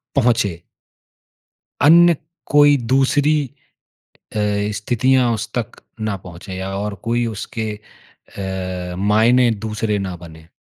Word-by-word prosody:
पहुँचे। 115 -10 +1 1.2
अन्य 170 +3 +7 0.4
कोई 145 -1 +6
दूसरी 135 +5 +2 1.0
अ, - - -4 0.4
स्थितियाँ 125 +3 +2
उस 110 +1 -5
तक 120 -4 -4 0.2
ना 110 -2 -2
पहुँचें 90 +1 -10
या 95 +1 -4
और 105 +1 -3
कोई 120 +1 0
उसके 110 0 -4 1.2
अ, - - -7
मायने 115 +5 +4 0.2
दूसरे 105 -1 -1
ना 95 -2 -4
बनें। 80 -2 -13
110 Hz, 105 wpm, -19 LUFS, 100-130 Hz, 1.2 s, अन्य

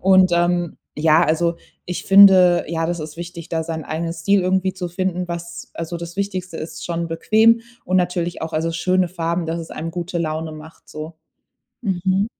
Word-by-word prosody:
Und, 190 -1 +5
ähm, 175 0 +1 0.2
ja, 160 +2 +4
also 165 +2 +1 0.3
ich 180 - -4
finde, 190 -3 +7
ja, 165 -1 -1
das 175 0 -2
ist 155 +1 -7
wichtig, 170 0 -7
da 160 -1 0
seinen 160 -2 -4
eigenen 165 +2 -3
Stil 190 +4 +2
irgendwie 190 +1 +1
zu 180 -1 -5
finden, 180 0 -2
was 170 0 -7
also 165 +1 -4
das 170 +1 -8
Wichtigste 185 -4 -3
ist 155 - -7
schon 170 -1 -2
bequem 220 +7 +4 0.2
und 185 +1 +1
natürlich 175 -1 -1
auch, 160 - -4
also, 165 +1 0
schöne 185 +1 +1
Farben, 170 0 -2
dass 165 +1 -3
es 165 - -9
einem 165 +2 -5
gute 175 +1 -4
Laune 160 -1 -3
macht 155 +1 -13
so. 155 +2 -7 0.7
Mhm. 190 -1 0
170 Hz, 185 wpm, -21 LUFS, 165-185 Hz, 0.7 s, finde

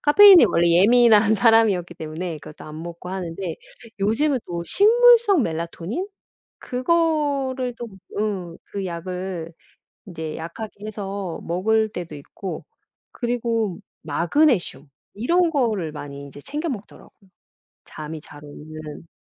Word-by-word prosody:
카페인에 380 +2 +8
원래 170 -3 +2
예민한 215 +5 +6
예민한 220 0 +3
사람이었기 215 -6 +3
때문에 160 +1 -5
그것도 150 +1 -12
안 155 +1 -8
먹고 170 +1 -8
하는데. 185 0 -5 0.4
요즘은 255 +8 +1
또 170 -1 -4
식물성 450 - +5
멜라토닌? 170 - -4 0.5
그거를 275 -3 0
또 240 0 -7 0.3
응. 190 -6 -3
그 200 -1 -5
약을 180 -1 -5 0.6
인제 160 -4 -6
약하게 205 +5 -8
해서 200 -4 -5
먹을 220 +6 +1
때도 175 -7 -7
있고 165 +6 -8 0.5
그리고 230 -5 -2 0.2
마그네슘 170 - +1 0.3
이런 335 - +2
거를 220 - 0
많이 140 -2 -8
인제 140 0 -11
챙겨 305 - -4
먹더라고요, 205 -4 -10 0.6
잠이 155 +1 -8
잘 145 0 -14
오는. 155 +2 -10
195 Hz, 275 characters per minute, -22 LUFS, 170-245 Hz, 0.6 s, 카페인에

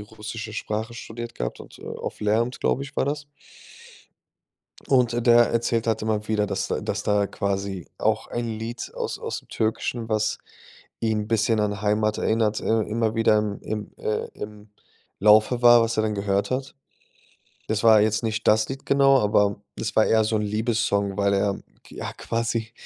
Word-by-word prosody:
russische 110 +1 -7
Sprache 110 +1 -3
studiert 120 0 -7
gehabt - - -4
und, - - -13
äh, - - -12
auf - - -6
Lehramt, 115 +4 0
glaube 135 - +1
ich, 140 +1 -9
war - - +2
das. 145 0 -3 1.6
Und 120 -2 +2
der 120 0 +6
erzählt 115 0 0
halt 110 -1 0
immer 110 -1 -1
wieder, 105 -1 +1
dass 100 0 -2
da - - -2
dass - - -3
da 105 -1 +2
quasi 100 -2 -3
auch 110 0 +1
ein 120 0 -3
Lied 115 +2 -6
aus - - -3
aus'm - - -5
Türkischen, 115 +1 -2
was 110 0 0 0.6
ihn 110 -2 0
'n 105 - -6
bisschen 110 0 +2
an 105 -1 -1
Heimat 105 +1 +1
erinnert 110 -1 +1
äh, 110 0 +1
immer 110 +1 -1
wieder 115 -1 +3
im 105 -1 -2
im 105 -1 -5
äh, 110 - -2
im 105 0 -9 0.5
Laufe 110 +4 +5
war, 120 -1 +7
was 115 0 -1
er 110 - +4
dann 105 -1 -1
gehört 100 0 0
hat. 130 +2 -3 0.9
Das 110 0 -1
war 110 -2 +7
jetzt 110 +2 +1
nicht 110 -1 -2
das 110 0 +4
Lied 135 +1 -7
genau, 135 -1 +5
aber 105 -1 +2 0.2
das 105 -3 -4
war 110 - +5
eher 110 0 +4
so 110 +1 0
'n 105 - 0
Liebessong, 105 -2 0
weil 100 -1 +2
er 100 0 0 0.3
ja - - -6
quasi, 115 -1 -2
110 Hz, 180 wpm, -24 LUFS, 105-115 Hz, 1.6 s, war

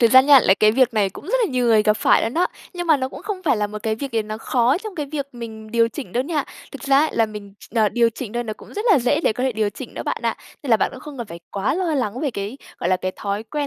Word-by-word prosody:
thực 230 -2 +5
ra 260 - +9
nha, 275 0 +7
là 190 - +4
cái 215 +1 +4
việc 250 -1 +3
này 205 -2 +2
cũng - - -11
rất 410 - -1
là 410 - -2
nhiều 250 -2 +1
người 220 -2 +5
gặp 215 0 +3
phải - - +4
luôn 225 - -2
đó. 350 +3 +3 0.3
Nhưng 350 0 -4
mà 315 -3 +5
nó 260 -1 -2
cũng - - -10
không 410 -3 -4
phải 300 -8 +2
là 210 -1 0
một 210 0 -8
cái 220 -1 0
việc 270 +4 -6
gì 225 -1 +1
nó 215 +1 -6
khó 250 +5 +2
trong 430 0 -8
cái 300 -4 -3
việc 280 -1 -4
mình 220 -2 -8
điều 230 0 +3
chỉnh 275 +3 -8
đâu 245 - +1
nha. 295 -2 -1 0.3
Thực 280 - -9
ra 275 -1 +4
ấy, 310 +2 +3
là 225 - +4
mình 205 -2 -9
ch - - -15
ờ, 220 -2 +4
điều 230 +3 +2
chỉnh 225 -1 -7
thôi 240 0 -2
nó 220 - -4
cũng - - -14
rất 420 - -3
là 360 - +6
dễ 255 +5 +1
để 330 - +2
có 250 - -4
thể 260 - +1
điều 215 -2 0
chỉnh - - -9
đó - - -4
bạn - - -2
ạ. - - 0 0.3
Nên 280 - -4
là 225 - +7
bạn - - 0
cũng 260 - -10
không 290 0 -10
cần 235 - -4
phải 170 -3 -9
quá 200 +6 -1
lo 370 +2 -1
lắng 245 -4 -1
về 295 -3 0
cái, 210 +4 -5 0.2
gọi - - -1
là, 185 - +4
cái 185 0 -3
thói 200 +1 -3
quen 290 +6 -3
240 Hz, 340 wpm, -22 LUFS, 215-280 Hz, 0.3 s, ra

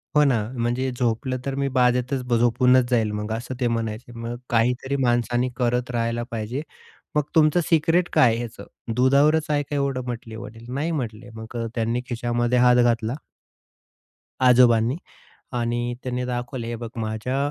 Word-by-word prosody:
हो 150 - +6
ना, 135 -5 +3 0.2
म्हणजे 120 +3 0
झोपलं 125 +2 0
तर 135 - -2
मी 140 0 0
बाजेतच 125 +1 +2 0.2
झोपूनच 125 +1 +4
जाईल 115 -4 +2
मग 105 +1 -4
असं 120 +3 -5
ते 125 - +1
म्हणायचे. 115 0 -3
मग 115 +1 -4
काहीतरी 125 +4 +1
माणसाने 120 +1 +1
करत 125 0 0
राहायला 115 0 -1
पाहिजे. 115 +5 -3 0.5
"मग 150 - +3
तुमचं 155 +2 +5
सिक्रेट 165 +2 +3
काय 130 - +6
आहे 115 - 0
ह्याचं? 120 -2 -7 0.3
दुधावरच 140 +5 +4
आहे 145 -1 +1
का 145 - -5
एवढं?" 140 -2 -1
म्हटले 115 -2 -6
वडील. 115 0 -10
"नाही" 150 +5 -1
म्हटले, 120 -6 -4
मग 110 +2 -9
अ, 115 - -2
त्यांनी 115 +1 0
खिशामध्ये 120 +1 0
हात 125 0 +6
घातला 115 -1 +1 1.3
आजोबांनी 120 0 +5 0.6
आणि 120 0 -1
त्यांनी 125 0 -2
दाखवले, 120 -1 -4
"हे 120 0 -3
बघ, 115 0 -6
माझ्या 110 +4 -2
120 Hz, 160 wpm, -24 LUFS, 115-130 Hz, 1.3 s, हो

